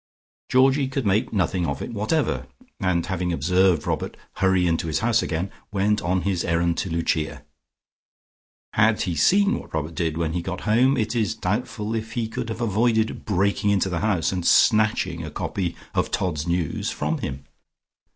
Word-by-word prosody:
Georgie 135 +2 +4
could 135 -2 -3
make 100 +2 +1
nothing 95 -4 0
of - - -2
it - - -6
whatever, 115 +9 0 0.3
and 90 -5 +1
having 90 -1 -2
observed 90 +2 +2
Robert - - -3 0.2
hurry 95 -1 +3
into 85 -1 0
his 80 - 0
house 115 +1 +2
again, 90 +5 -2 0.2
went 105 +1 +1
on 90 +1 0
his 95 -3 0
errand 85 0 +1
to 95 - -2
Lucia. 80 -3 -1 1.3
Had 110 0 +3
he 90 - -2
seen 200 - +3
what - - -9
Robert 80 +1 -3
did 80 -2 -1
when 80 -1 -1
he 90 - -1
got 90 +1 -5
home, 125 +5 +3
it 110 +1 -1
is 110 -1 0
doubtful 105 +1 -2
if 110 0 -4
he 115 -2 -1
could 115 +1 -5
have 110 +1 -5
avoided 110 0 +1
breaking 100 +1 +1
into 95 -1 +2
the 90 -2 -2
house 100 -5 +1
and 90 -2 -2
snatching 105 -6 +3
a 80 - -5
copy 90 +2 -3 0.2
of - - 0
"Todd's 85 -5 -2
News" 85 -2 -1
from - - -2
him.... 70 0 -5
95 Hz, 175 wpm, -24 LUFS, 85-110 Hz, 1.3 s, Georgie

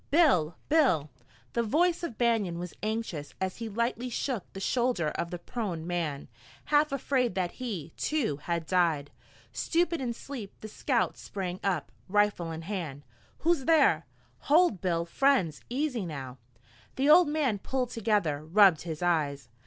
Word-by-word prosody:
"Bill! 260 - +4
Bill!" 185 - +3 0.4
The 235 - +1
voice 330 +10 +2
of 290 -11 -5
Banion 225 -8 +1
was 175 0 -6
anxious 215 -9 -3
as 190 0 -2
he 230 -1 -5
lightly 235 +3 -1
shook 240 -3 -3
the 195 - -8
shoulder 235 -6 +1
of 170 - -3
the 175 - -4
prone 175 -4 -4
man, 165 -5 -2 0.4
half 300 0 +3
afraid 255 -5 0
that 180 -2 0
he, 190 - -5
too, 270 - 0
had 170 +2 -3
died. 165 -5 +1 0.4
Stupid 335 -2 0
in 245 -2 -1
sleep, 235 -7 -8
the 215 - -6
scout 215 - 0
sprang 185 -3 -5
up, 175 -11 -1 0.2
rifle 205 -4 +2
in 160 0 -6
hand. 165 -7 -5 0.4
"Who's 335 -5 +3
thar?" 280 - +4 0.3
"Hold, 300 - +3
Bill! 170 -2 0
Friends! 190 - +2
Easy 250 - -1
now!" 135 -5 -7 0.6
The 270 +2 +1
old 330 +3 +8
man 290 -8 0
pulled 250 +2 -2
together, 205 -11 0
rubbed 180 0 +5
his 165 -1 -5
eyes. 145 -7 0
200 Hz, 155 wpm, -29 LUFS, 165-255 Hz, 0.6 s, old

